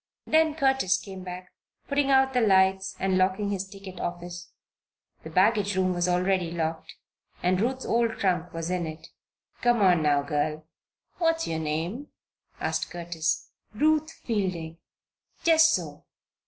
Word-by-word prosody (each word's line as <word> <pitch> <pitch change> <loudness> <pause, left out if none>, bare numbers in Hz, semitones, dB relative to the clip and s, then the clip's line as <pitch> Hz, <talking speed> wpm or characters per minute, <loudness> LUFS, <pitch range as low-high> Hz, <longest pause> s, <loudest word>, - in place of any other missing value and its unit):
Then 315 -1 +3
Curtis 265 - +2
came 185 +1 -9
back, 180 0 -8 0.4
putting 280 0 +1
out 265 0 +4
the 250 - +2
lights 190 -2 +3
and 190 -1 +1
locking 190 +2 +1
his 195 -1 -3
ticket 195 -2 -10
office. 175 0 -6 0.7
The 160 - -9
baggage 200 +3 +2
room 185 -1 +2
was 175 0 0
already 180 0 +1
locked 165 -1 -4 0.5
and 185 +1 +2
Ruth's 260 +3 -1
old 230 -1 +1
trunk 180 -2 0
was 165 +1 -4
in 180 -2 -1
it. 155 0 -9 0.5
"Come 240 -2 +3
on 180 -3 +5
now, 145 -2 +2
girl 150 +1 -2 0.5
What's 330 -1 +1
your 160 -1 -2
name?" 165 - -3 0.5
asked 160 0 -2
Curtis. 170 -2 -3 0.2
"Ruth 310 +5 +2 0.2
Fielding." 180 -7 -2 0.6
"Just 320 -1 +6
so! - - -6
185 Hz, 140 wpm, -27 LUFS, 170-230 Hz, 0.7 s, Just